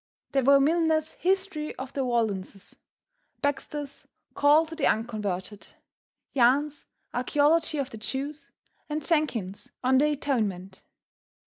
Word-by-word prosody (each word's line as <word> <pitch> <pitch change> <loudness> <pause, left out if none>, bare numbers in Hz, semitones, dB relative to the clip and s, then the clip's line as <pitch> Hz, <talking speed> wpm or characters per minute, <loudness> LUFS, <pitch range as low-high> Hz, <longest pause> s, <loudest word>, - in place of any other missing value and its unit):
There 275 - +2
were 275 +2 +6
Milners' 315 +1 +2
"History 370 -4 -1
of 260 0 -7
the 275 - -1
Waldenses," 215 -6 -2 0.7
Baxter's 285 0 -3 0.3
"Call 295 +3 +5
to 320 - -10
the 315 -3 +1
Unconverted," 210 -3 -2 0.7
Yahn's 280 +4 +2 0.3
"Archaeology 300 +5 +2
of 275 -2 -2
the 220 - -8
Jews," 280 +7 -5 0.4
and 300 0 -3
Jenkyns' 245 - -1
"On 260 +1 +4
the 295 - +4
Atonement." 210 -11 -2
275 Hz, 115 wpm, -27 LUFS, 230-300 Hz, 0.7 s, were